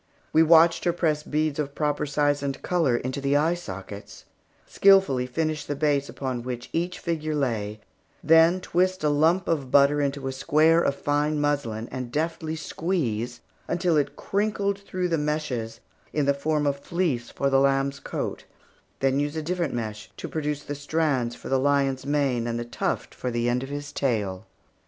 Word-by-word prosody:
We 160 - +6
watched 165 +1 +6
her 175 - +3
press 155 -3 0
beads 155 0 -1
of 145 -1 -3
proper 150 -1 0
size 145 0 +1
and 140 -1 -3
color 160 -9 +2
into 130 +3 -4
the 140 +1 +2
eye 160 +4 +2
sockets; 100 - -8 0.4
skilfully 190 -11 +4
finish 155 +3 -2
the 145 - -4
base 145 -1 +1
upon 130 -3 -4
which 125 0 -6
each 175 +2 -1
figure 155 -2 -2
lay; 110 -6 -2 0.4
then 165 +3 +5
twist 185 0 0
a 150 - +3
lump 160 +5 +2
of 145 -6 -1
butter 145 +2 +5
into 140 -1 -2
a - - -1
square 155 +5 +3
of 140 - +1
fine 145 +1 0
muslin, 140 -7 -1
and 125 -2 -5
deftly 160 +2 -2
squeeze, 125 - -2 0.3
until 175 -1 +1
it 145 -2 0
crinkled 200 -1 -1
through 185 -2 -3
the 165 -2 +1
meshes 135 -7 -3 0.3
in 150 -2 +1
form 150 +1 0
of 140 -1 0
fleece 155 -7 -1
for 140 0 -1
the 135 - +5
lamb's 135 0 +1
coat, - - -4 0.6
then 135 0 +2
use 145 +1 -1
a 160 - -3
different 170 -4 -2
mesh 105 -3 -5
to - - -5
produce 150 -2 -3
the 145 - -5
strands 145 -4 -1
for - - -10
the 135 - +2
lion's 140 -1 +1
mane 135 -5 +1
and 115 0 -2
the 120 - -4
tuft 120 - -3
for 125 - -4
the 120 0 -1
end 120 +1 +1
of 135 - -6
his 145 0 -5
tail. 105 -7 -2
145 Hz, 180 wpm, -25 LUFS, 130-160 Hz, 0.6 s, We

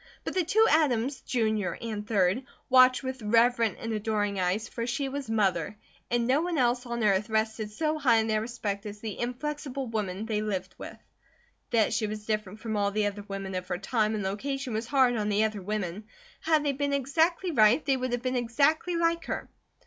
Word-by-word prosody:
But - - -4
the 370 - +2
two 440 +7 +4
Adams, 270 -4 +2
Jr. 220 -6 0
and 215 -3 -4
3d, 205 +3 +1 0.2
watched 255 0 +6
with 260 -1 -4
reverent 230 +1 +3
and 225 0 -3
adoring 210 -2 -1
eyes, 185 +4 0
for 230 0 -4
she 275 +3 -1
was 275 -2 -5
MOTHER, 195 -4 0 0.3
and 240 -1 +1
no 265 +5 +3
one 345 -1 -1
else 245 -1 +1
on 235 -1 -2
earth 205 +1 +2
rested 220 0 -1
so 310 +6 -1
high 250 -6 +4
in 220 - +2
their 215 -1 +1
respect 215 -3 -4
as 205 0 -8
the 215 -2 -6
inflexible 275 +2 -3
woman 210 -3 -3
they 215 -2 -1
lived 190 -3 -3
with. - - -8 0.7
That 225 -2 +2
she 215 -1 0
was 210 0 -6
different 215 -1 -3
from 220 -2 -3
all 200 -1 +1
the 210 +1 0
other 205 0 -3
women 195 -1 -5
of 185 0 -4
her 180 - -2
time 215 +2 0
and 210 - -2
location 260 +6 -3
was 220 +2 -2
hard 260 -2 +3
on 210 -1 -1
the 210 +1 +2
other 215 -2 -1
women. 205 0 -3 0.3
Had 315 -2 +2
they 285 - +2
been 280 +1 -1
exactly 320 +7 +1
right, 235 +1 +4
they 275 - +3
would 255 -1 -2
have 245 0 -2
been 255 0 -1
exactly 280 +8 +1
like 335 -1 +1
her. - - -4
225 Hz, 205 wpm, -28 LUFS, 210-265 Hz, 0.7 s, watched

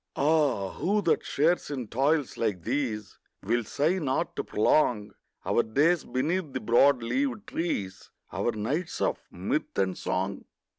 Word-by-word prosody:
Ah, 140 -10 +2
who 205 +3 0
that 170 - +2
shares 165 +5 +1
in 130 -5 -4
toils 140 +5 +1
like 100 -7 -1
these 115 - -3 0.2
Will 120 +4 +1
sigh 155 - 0
not 135 -5 -1
to - - -2
prolong 105 -3 +2 0.3
Our - - +3
days 150 +10 +2
beneath 155 +3 -1
the - - -2
broad 120 +3 +4
leaved 255 - -1
trees, 100 - -3 0.2
Our 120 - 0
nights 130 +11 -3
of - - 0
mirth - - -3
and 95 -2 +1
song? - - -3
135 Hz, 145 wpm, -28 LUFS, 110-160 Hz, 0.3 s, broad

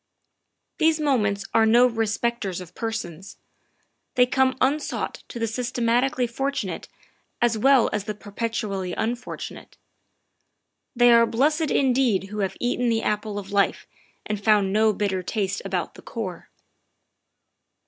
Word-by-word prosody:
These 320 0 +3
moments 210 -9 +1
are 225 - +5
no 240 +3 +6
respecters 225 -4 -1
of 180 -2 -10
persons; 200 -6 -5 0.8
they 250 - +6
come 260 0 +1
unsought 290 +3 -1
to - - -8
the 230 - 0
systematically 245 +2 0
fortunate 270 +4 -3 0.5
as 240 -1 +2
well 260 +2 +4
as 210 -1 -2
the 215 -1 -4
perpetually 205 -3 -3
unfortunate. 240 +2 -5 1.2
They 240 0 +6
are 230 0 +6
blessed 300 +7 +1
indeed 245 -8 +2
who 210 +1 -5
have 195 -2 -2
eaten 245 0 0
the 225 -1 +1
apple 210 0 -2
of 200 0 -7
life 200 -1 +1 0.4
and 210 -1 -4
found 205 -3 +3
no 215 +1 +4
bitter 200 -3 -1
taste 200 +1 -2
about 190 -3 -3
the - - -13
core. 185 -7 -6
225 Hz, 130 wpm, -24 LUFS, 200-245 Hz, 1.2 s, no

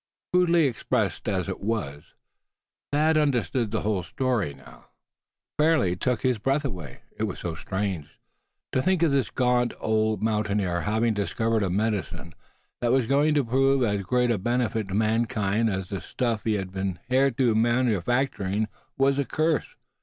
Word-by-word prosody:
Crudely 175 -3 +4
expressed 115 -4 -1
as 95 -4 -1
it - - -4
was, 100 -10 -4 0.8
Thad 155 +2 +3
understood 130 -5 +1
the 110 +1 -1
whole 105 -3 0
story 115 - -1
now. 65 - -15
It - - -12
fairly 150 - +3
took 125 +5 -1
his 125 -3 +1
breath 135 +6 0
away, 85 - -6
it - - -1
was - - -5
so 85 - -4
strange. 95 -2 -3 0.6
To 130 - +1
think 185 +2 +2
of 165 - +3
this 135 -4 +1
gaunt 125 -1 +1
old 110 0 0
mountaineer 105 -5 0
having 110 +3 +1
discovered 110 +2 0
a 95 - 0
medicine 100 -3 -2 0.5
that 120 -1 +2
was 130 -2 +3
going 145 +5 +2
to 145 - +3
prove 135 +2 +2
as 100 -3 0
great 125 +4 +1
a 110 - 0
benefit 120 -1 -1
to 95 - -4
mankind 110 0 +1
as 95 -2 -3
the 100 -2 -4
stuff 115 -4 -2
he 110 - +2
had 95 -3 -3
been 95 -2 -3
hitherto 130 -2 +2
manufacturing 110 -2 +1 0.3
was 135 +1 +2
a 140 - +1
curse! 155 +2 0
115 Hz, 160 wpm, -26 LUFS, 100-130 Hz, 0.8 s, Crudely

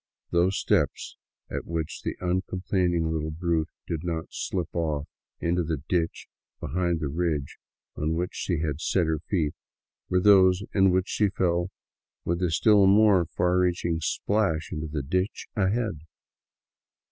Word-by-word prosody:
Those 90 +3 +2
steps - - 0 0.4
at - - -4
which 80 -2 -3
the - - -3
uncomplaining 90 -2 0
little 80 -1 -2
brute 80 0 -1 0.2
did 80 -1 -3
not 80 -2 -3
slip 90 -4 -3
off 75 -4 -1 0.3
into 85 +1 +1
the 80 -1 -1
ditch 85 -3 -1 0.3
behind 85 +2 -1
the 75 - -2
ridge 75 -2 -2 0.4
on 80 +2 -1
which 90 +2 -1
she 85 -4 -2
had 75 -1 -2
set 90 -1 +1
her 80 -1 0
feet 80 -2 -1 0.6
were 90 - +3
those 95 -1 +5
in 95 -1 +5
which 95 +2 +1
she 105 -2 +1
fell 85 -1 0 0.6
with 85 +1 -1
a 90 - +2
still 100 +4 +5
more 100 -3 +5
far 90 +1 +3
reaching 85 -2 +1
splash 90 -3 0
into 80 0 -4
the 75 -2 -3
ditch 95 - -1
ahead. 105 -3 0
85 Hz, 145 wpm, -26 LUFS, 80-95 Hz, 0.6 s, those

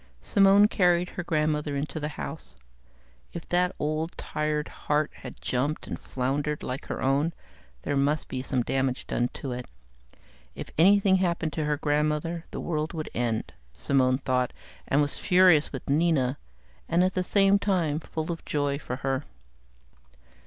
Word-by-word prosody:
Simone 200 +1 +6
carried 180 -4 +2
her 175 - -5
grandmother 150 -2 0
into 140 +2 -3
the 150 - -2
house. 70 -4 -7 0.8
If 170 - -7
that 180 +1 +1
old, 155 +2 -2
tired 150 0 -2
heart 150 0 -1
had 125 - -10
jumped 140 +5 -1
and - - -5
floundered 140 +3 -2
like 130 +3 -4
her - - -4
own, 140 +5 +2 0.5
there 145 - -1
must 140 +2 +1
be 130 - -4
some 130 -2 -1
damage 130 +1 -1
done 120 - 0
to 135 - -5
it. 125 0 -5 0.9
If - - -7
anything 195 +3 +5
happened 170 -3 0
to 155 - -2
her 150 0 0
grandmother, 150 +3 0
the - - -6
world 155 -1 -2
would 155 -2 -5
end, 115 -2 -2 0.2
Simone 130 - +2
thought, 125 -2 0 0.3
and 140 - +3
was 145 - -1
furious 180 -4 +5
with 135 - -7
Nina, 145 -3 +2 0.5
and 170 +2 +3
at 185 0 +1
the 185 - 0
same 195 +1 +4
time, 170 -7 +1
full 160 0 -4
of 165 - -6
joy 145 -1 -1
for 125 - -5
her. 135 +1 0
150 Hz, 160 wpm, -27 LUFS, 135-170 Hz, 0.9 s, Simone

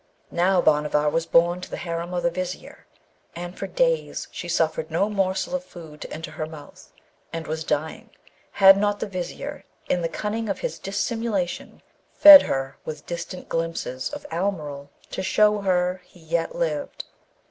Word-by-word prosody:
Now, 180 +1 +3
Bhanavar 150 0 +2
was 165 +1 -1
borne 175 +2 +3
to - - -8
the - - -5
harem 170 0 -4
of 175 -1 -2
the 170 - +2
Vizier, 185 +1 -6 0.5
and 175 +1 -6
for - - -5
days - - 0
she - - -6
suffered 485 - 0
no 205 +2 0
morsel 195 +3 -1
of 275 0 -1
food 160 - -12
to - - -7
enter 160 +1 -6
her 155 - -4
mouth, 150 -2 -13 0.4
and 165 -1 -5
was 160 +1 -3
dying, 155 +1 -3 0.4
had 195 0 +8
not 205 0 0
the - - -2
Vizier 185 -3 -6 0.2
in 180 - +1
the 165 - -1
cunning 210 +6 -3
of 195 - -3
his - - -3
dissimulation 205 -1 -3 0.3
fed 300 -1 +11
her 135 0 -3
with 150 -2 -7
distant 170 +1 -6
glimpses 165 -6 -3
of - - -8
Almeryl, 155 -6 -3 0.2
to - - -3
show 210 +2 +3
her 180 -1 0
he 180 - -21
yet 165 - -2
lived. - - -3
175 Hz, 170 wpm, -24 LUFS, 160-200 Hz, 0.5 s, fed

